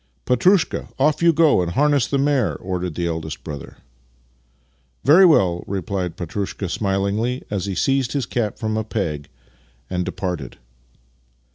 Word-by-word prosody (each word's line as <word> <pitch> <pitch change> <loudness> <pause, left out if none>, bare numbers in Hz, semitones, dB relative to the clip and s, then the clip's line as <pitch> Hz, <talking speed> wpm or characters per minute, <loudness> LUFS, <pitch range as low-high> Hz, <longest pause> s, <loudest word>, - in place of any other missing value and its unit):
" - - -43
Petrushka, 180 - +2
off 150 +4 +2
you 170 0 +6
go 160 - +4
and 85 -1 -2
harness 145 -2 +3
the 140 - 0
mare," 140 -4 +1
ordered 90 -3 -4
the 85 - -2
eldest 80 -2 -4
brother. 75 -3 -8 0.6
" 60 +1 -41
Very 175 +7 +8
well," 90 - +3
replied 95 -2 -3
Petrushka 95 +2 -4
smilingly 100 +6 -1
as 100 -1 -2
he 95 - -3
seized 135 +5 +1
his 140 -3 -1
cap 110 -4 -2
from 110 -2 -2
a 110 - 0
peg 80 -10 -3 0.6
and 90 -1 0
departed. 90 -6 -4
100 Hz, 150 wpm, -21 LUFS, 85-130 Hz, 0.6 s, Very